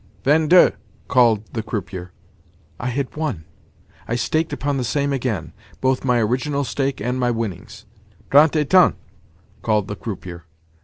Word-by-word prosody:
"Vingt 155 +2 +3
deux!" 180 0 +7 0.4
called 115 -5 +4
the 115 - -2
croupier. 95 -4 -5 0.7
I 120 - -3
had 125 +1 -3
won! 145 - -3 0.6
I 120 - -1
staked 155 +7 0
upon 140 0 -2
the 130 - -1
same 140 +3 0
again—both 130 +2 -3
my 125 -2 +2
original 130 +6 0
stake 135 0 -2
and 125 +5 -2
my 125 -1 +1
winnings. 105 -2 -5 0.5
"Trente 150 +3 +6
et 145 +2 -5
un!" 185 -1 +6 0.7
called 105 -3 +1
the 105 - -5
croupier. 90 -6 -7
125 Hz, 145 wpm, -21 LUFS, 105-140 Hz, 0.7 s, deux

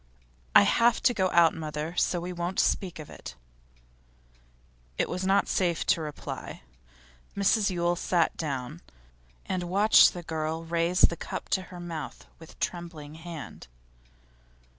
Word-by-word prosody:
'I - - +9
have 230 - +3
to 250 - +4
go 190 -4 +1
out, 170 -2 +5
mother, 155 +1 -5
so 175 - +1
we 180 +1 -5
won't 175 +2 -3
speak 185 -4 0
of 155 -2 -8
it.' - - -10 1.6
It - - +1
was 185 +1 -3
not 195 +1 +3
safe 175 -3 0
to 165 - +2
reply. 150 - -7 0.7
Mrs 200 +1 +3
Yule 175 -1 0
sat 175 -1 +1
down, 145 +1 -4 0.6
and 180 -2 -3
watched 205 +2 +6
the 175 - -6
girl 160 0 -3
raise 170 +2 0
the 170 - +5
cup - - -6
to 190 - +1
her 180 -1 -9
mouth 165 -3 -7
with 160 - -15
trembling 165 -4 -5
hand. 160 - -9
170 Hz, 140 wpm, -28 LUFS, 160-180 Hz, 1.6 s, I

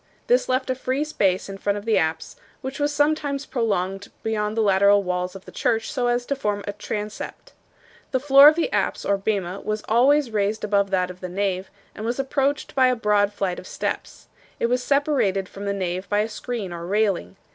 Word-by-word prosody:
This - - +2
left 260 +1 +1
a - - +2
free 260 +2 -1
space 195 -12 0
in 195 0 -8
front 200 +1 0
of 205 - -7
the 225 -2 +3
apse, 160 0 -2 0.3
which 265 +1 -6
was 290 0 +1
sometimes 290 -1 0
prolonged 200 -4 -1 0.2
beyond 215 -1 -1
the - - +3
lateral 200 0 +4
walls 180 0 -2
of 190 - -10
the - - -11
church 225 -1 0
so 250 -2 0
as 240 0 0
to 280 - -1
form 210 -6 -2
a 205 - -4
transept. 210 +1 -6 0.6
The 260 - 0
floor 275 +1 +8
of 305 - +7
the 340 +8 0
apse - - -1
or 200 - +2
bema 195 -2 -2
was 215 0 -3
always 260 +3 +4
raised 210 0 0
above 200 -1 +2
that 185 -1 0
of 180 - -13
the 185 - -6
nave, 190 0 -2 0.2
and 215 - -8
was 235 +2 -1
approached 275 +1 -1
by 260 -3 +4
a 255 - +2
broad 210 -3 +2
flight 195 -3 -2
of - - -11
steps. - - -5 0.3
It - - +1
was 250 +1 +1
separated 265 -9 +1
from 200 +2 -8
the 200 - 0
nave 185 -1 -3
by 205 0 +2
a 220 - -2
screen 215 -4 -5
or 170 0 -6
railing. 195 - 0
210 Hz, 210 wpm, -23 LUFS, 195-260 Hz, 0.6 s, floor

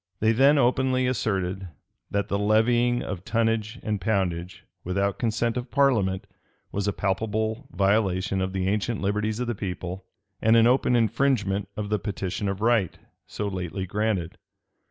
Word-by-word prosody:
They 110 +1 +3
then 135 +6 +5
openly 130 0 +2
asserted, 95 -6 -1 0.4
that 100 0 -1
the 100 - -1
levying 120 +4 +3
of 95 -4 -5
tonnage 115 0 0
and 105 -3 -2
poundage 90 -4 -1 0.2
without 100 +2 -1
consent 115 0 0
of 125 0 -4
parliament, 110 -10 +2 0.5
was 100 0 -2
a - - +2
palpable 110 +5 -2
violation 95 -1 +1
of 95 0 -1
the 95 -1 -1
ancient 105 +2 0
liberties 105 +2 -1
of 125 - -1
the 120 - -1
people, 95 -2 -5 0.4
and 110 +1 +5
an 115 0 +6
open 125 0 +3
infringement 110 -4 +1
of 105 -1 -3
the 105 -1 +1
petition 100 0 -3
of 100 +1 -4
right, 115 -6 +2 0.3
so 105 - -4
lately 95 -1 -4
granted. 100 -3 -2
105 Hz, 155 wpm, -26 LUFS, 95-115 Hz, 0.5 s, an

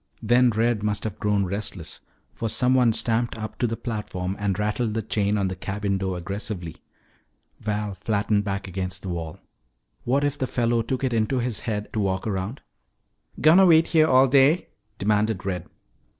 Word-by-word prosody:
Then 120 +3 +4
Red 115 0 +1
must 105 -1 -1
have 110 -4 -5
grown 105 -2 +1
restless, 95 -3 -5 0.3
for 115 - -3
someone 125 0 +3
stamped 115 +1 0
up 110 -1 -7
to 120 - +2
the 115 0 -3
platform 105 -6 -4
and 100 -2 -1
rattled 105 +1 -1
the 110 - -1
chain 105 -1 0
on 100 -2 +1
the 95 - -3
cabin 100 +1 -2
door 95 -1 -2
aggressively. 95 -1 -5 0.8
Val 105 -1 -2
flattened 100 +1 0
back 100 -1 -3
against 95 0 -4
the 95 - -5
wall. 85 -3 -5 0.7
What 135 +4 +1
if 145 0 -1
the 130 - 0
fellow 120 -1 +1
took 130 +3 -3
it 130 -2 0
into 115 +3 +1
his 120 -3 -1
head 105 -3 -3
to 110 - -1
walk 95 -2 -1
around? 100 +4 -3 0.8
"Gonna 175 +5 +7
wait 165 -1 +5
here 155 -2 +4
all 130 -1 +5
day?" 140 +6 +4 0.3
demanded 105 0 0
Red. 90 -3 -3
105 Hz, 175 wpm, -24 LUFS, 100-120 Hz, 0.8 s, Gonna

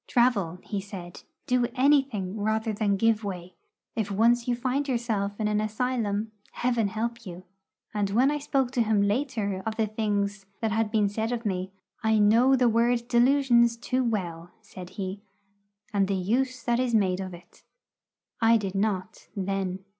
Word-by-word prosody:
'Travel,' 210 -9 +2
he 200 -2 -3
said; 185 -3 -9 0.2
'do 250 -1 +2
anything 260 -8 +2
rather 220 +1 0
than 205 -2 +1
give 225 +1 +2
way. 185 -3 -6 0.4
If 220 -3 -1
once 235 +4 +3
you 245 - +1
find 260 +4 -1
yourself 220 -5 -1
in 215 - +1
an 210 0 +1
asylum, 215 -1 -1 0.2
Heaven 240 -3 +1
help 230 +3 -3
you!' 180 -3 -9 0.5
And 205 -2 0
when 250 +8 +3
I 295 - -1
spoke 270 -3 0
to 250 - +1
him 215 -2 +2
later 205 -3 -1
of 220 -1 -3
the 220 0 +1
things 205 -2 -2
that 220 -1 -1
had 220 0 +1
been 210 -2 +2
said 220 +3 -2
of 240 -1 -3
me, 185 -2 -2 0.3
'I 220 0 +3
know 230 +6 +5
that 250 -2 +3
word 235 +1 +2
"delusions" 240 -1 +4
too 255 +2 -1
well,' 175 -7 -3
said 185 -3 -10
he, 195 0 -4 0.7
'and 200 -1 +2
the 195 - 0
use 245 +6 -1
that 240 0 +1
is 250 -2 +1
made 190 -3 +2
of 185 -2 -5
it.' 175 - -18 0.8
I 230 0 +6
did 195 -3 -4
not, 195 -1 -2
then. 190 -1 -3
220 Hz, 170 wpm, -27 LUFS, 200-240 Hz, 0.8 s, I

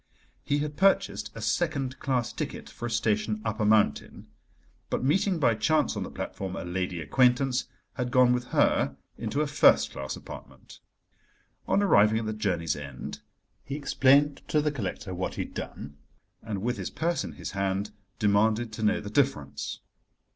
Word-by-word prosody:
He 145 - +1
had 145 0 -3
purchased 190 - +2
a 115 - -6
second 135 +1 -1
class 125 -4 -1
ticket - - -5
for 120 - -5
a - - -4
station 110 -1 0
up 110 0 -2
a 105 - +2
mountain, 105 -9 +1 0.6
but - - -1
meeting, 185 +7 +2
by 135 -7 +3
chance 155 +8 +1
on - - -3
the - - -4
platform, 95 -1 -5
a - - -4
lady 90 0 -2
acquaintance, 125 - +2 0.3
had 125 -1 -2
gone 125 0 +5
with 125 0 -1
her 70 - +2 0.2
into 115 +6 -2
a - - +2
first 145 0 +4
class 65 0 -5
apartment. - - -12 0.9
On 200 +1 +3
arriving 105 - +5
at 115 - -2
the 110 - -2
journey's 90 -8 -1
end 75 -1 -7 0.4
he 140 - -5
explained 140 0 +3
to 155 - +2
the 150 0 +1
collector 100 -7 -4
what 90 +1 -3
he - - -2
had - - -12
done, 70 0 -7 0.4
and, 105 -3 -5
with 120 0 -1
his 95 - -4
purse 170 +1 -1
in - - -7
his - - -6
hand, 100 +1 -1 0.3
demanded 110 +2 +2
to 110 - -6
know 105 -1 +2
the 105 - -7
difference. 75 - -1
110 Hz, 175 wpm, -28 LUFS, 100-135 Hz, 0.9 s, gone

